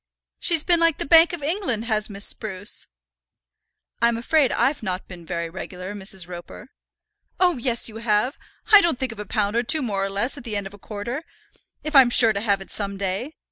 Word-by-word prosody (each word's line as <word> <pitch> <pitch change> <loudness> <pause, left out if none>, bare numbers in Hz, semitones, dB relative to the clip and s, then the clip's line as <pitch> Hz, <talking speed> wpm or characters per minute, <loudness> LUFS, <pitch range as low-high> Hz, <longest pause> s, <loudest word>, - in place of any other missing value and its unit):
She's 330 -4 +3
been 345 -2 +2
like 330 -2 +2
the - - -4
Bank 325 +2 +7
of 345 -5 -6
England, 290 - -1
has 215 -2 0
Miss 200 0 -1
Spruce." 200 -2 -3 1.1
"I'm 235 0 +3
afraid 275 +3 +2
I've 285 +2 0
not 185 -3 -4
been 175 -3 -12
very 170 -2 -3
regular, 180 +2 -8
Mrs. 190 -3 -3
Roper." 180 +7 -10 0.7
"Oh, 355 -5 +3
yes, 235 -1 0
you 220 -1 -7
have. 225 +4 0 0.4
I 415 -1 +10
don't 335 -7 +1
think 260 -2 -2
of 225 - -11
a 210 - -6
pound 205 +1 0
or 235 - +3
two 290 +5 +1
more 200 -5 -2
or 195 - -1
less 220 +9 -1
at - - -13
the 225 -3 -5
end 200 -1 -2
of 195 - -9
a 205 - -14
quarter, 230 - -6 0.6
if 305 0 -4
I'm 265 -3 +8
sure 230 -2 +5
to 200 - -2
have 200 -3 +1
it 195 - -8
some 200 -1 0
day. 200 +9 -2
220 Hz, 215 wpm, -23 LUFS, 200-275 Hz, 1.1 s, I